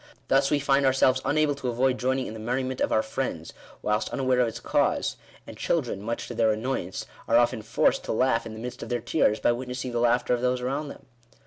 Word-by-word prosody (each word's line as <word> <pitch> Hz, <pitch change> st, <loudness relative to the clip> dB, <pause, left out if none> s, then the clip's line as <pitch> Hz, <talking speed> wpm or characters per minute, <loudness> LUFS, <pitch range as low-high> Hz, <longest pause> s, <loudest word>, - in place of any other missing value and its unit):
Thus, 135 Hz, +1 st, +4 dB
we 150 Hz, -, +3 dB
find 140 Hz, 0 st, +2 dB
ourselves 130 Hz, -1 st, +3 dB
unable 150 Hz, 0 st, +2 dB
to 140 Hz, -2 st, -5 dB
avoid 125 Hz, +1 st, +1 dB
joining 130 Hz, +1 st, 0 dB
in -, -, -6 dB
the 110 Hz, -, -8 dB
merriment 130 Hz, +3 st, -2 dB
of -, -, +1 dB
our 110 Hz, -, +3 dB
friends, 110 Hz, -9 st, -4 dB, 0.3 s
whilst 105 Hz, +1 st, 0 dB
unaware 130 Hz, -2 st, +1 dB
of 125 Hz, -, +3 dB
its 115 Hz, -, -5 dB
cause; -, -, +1 dB, 0.3 s
and -, -, -10 dB
children, 100 Hz, -, -1 dB
much 115 Hz, +3 st, -4 dB
to -, -, -6 dB
their 115 Hz, -1 st, +2 dB
annoyance, 110 Hz, -4 st, -2 dB, 0.2 s
are 115 Hz, -, +4 dB
often 120 Hz, -2 st, +2 dB
forced 110 Hz, +2 st, +1 dB
to -, -, -2 dB
laugh 115 Hz, -1 st, +1 dB
in 110 Hz, -, -8 dB
the 110 Hz, -, -8 dB
midst 125 Hz, +1 st, -6 dB
of -, -, -6 dB
their 120 Hz, -1 st, 0 dB
tears, 115 Hz, -2 st, +1 dB
by -, -, +3 dB
witnessing 125 Hz, +1 st, -4 dB
the 120 Hz, -, -1 dB
laughter 120 Hz, +1 st, +2 dB
of 120 Hz, -, 0 dB
those 125 Hz, 0 st, +1 dB
around 135 Hz, +4 st, -2 dB
them. -, -, -11 dB
125 Hz, 230 wpm, -26 LUFS, 115-130 Hz, 0.3 s, Thus